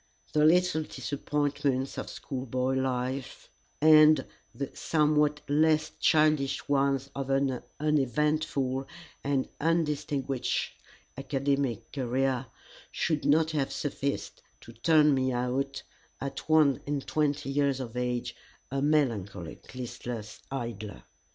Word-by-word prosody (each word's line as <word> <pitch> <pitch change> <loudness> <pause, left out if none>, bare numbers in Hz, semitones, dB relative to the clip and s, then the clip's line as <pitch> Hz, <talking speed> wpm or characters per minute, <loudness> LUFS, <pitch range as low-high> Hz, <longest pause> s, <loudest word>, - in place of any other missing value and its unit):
The 150 - +3
little 180 0 +4
disappointments 145 -2 -2
of - - -5
schoolboy 130 -1 -3
life, 130 0 -3 0.3
and 155 -2 +7 0.3
the 140 -1 -5
somewhat 150 -1 +2
less 155 +1 +3
childish 150 -3 +2
ones 140 -1 +1
of 135 -1 -4
an 135 -2 +1 0.2
uneventful 145 -2 0 0.4
and 140 -2 0
undistinguished 150 -5 0 0.5
academic 135 -3 -1
career, 130 0 -1 0.4
should 155 -3 -1
not 160 +2 +4
have 145 -3 -1
sufficed 140 -1 -3 0.2
to - - -12
turn 150 +4 +4
me 130 -1 +1
out 125 +3 -2 0.4
at 140 +3 -6
one 155 -5 +4
and 145 -2 -2
twenty 145 -2 0
years 140 -1 +1
of 125 -3 -6
age 125 -1 -2 0.4
a 135 0 -1
melancholic, 115 - -1
listless 120 -3 -6
idler. 115 -6 -5
140 Hz, 105 wpm, -29 LUFS, 130-150 Hz, 0.5 s, and